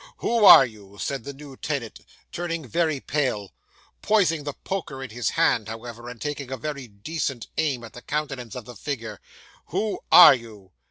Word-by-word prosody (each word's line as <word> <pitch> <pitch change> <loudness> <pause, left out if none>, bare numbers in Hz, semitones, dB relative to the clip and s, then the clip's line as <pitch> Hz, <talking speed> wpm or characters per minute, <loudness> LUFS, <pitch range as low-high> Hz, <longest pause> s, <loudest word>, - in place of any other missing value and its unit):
"Who 230 -3 +2
are 135 - +11
you?" 100 -4 -13
said 135 -4 -3
the 140 - -5
new 140 -1 -12
tenant, 135 -5 -4 0.3
turning 170 -4 -4
very 160 -1 0
pale; 130 -9 -2 0.5
poising 175 -8 +2
the 145 - -3
poker 165 -8 -5
in 130 - -8
his 120 -2 -1
hand, 110 - +2
however, 120 +1 -8
and 120 -1 -10
taking 145 -3 -4
a 130 - -3
very 140 -1 -5
decent 120 +4 -4
aim 140 -6 0
at 110 -2 -11
the 125 - -10
countenance 140 -6 -4
of 125 -3 -7
the 125 - -11
figure. 115 -8 -5 0.5
"Who 205 +5 -2
are 165 -5 +11
you?" 110 -7 -9
135 Hz, 175 wpm, -24 LUFS, 115-150 Hz, 0.5 s, are